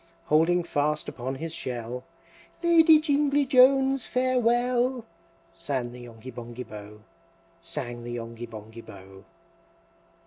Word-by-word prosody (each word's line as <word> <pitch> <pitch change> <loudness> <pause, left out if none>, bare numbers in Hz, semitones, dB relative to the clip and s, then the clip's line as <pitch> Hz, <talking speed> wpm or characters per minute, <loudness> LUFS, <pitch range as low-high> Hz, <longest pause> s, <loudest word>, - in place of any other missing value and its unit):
Holding 165 +3 +3
fast 150 -2 -1
upon 130 +2 -5
his 160 +4 -5
shell, 125 -1 -5 0.6
"Lady 325 -2 +7
Jingly 290 -2 +2
Jones, 265 -1 +4
farewell!" 250 0 +1 0.5
Sang 135 -7 -3
the 125 - -11
Yonghy 120 +1 -10
Bonghy 120 +1 -8
Bò, 105 0 -11 0.6
Sang 120 -7 -5
the 120 0 -6
Yonghy 115 0 -7
Bonghy 110 +1 -10
Bò. 95 -2 -13
145 Hz, 110 wpm, -27 LUFS, -, 0.6 s, Lady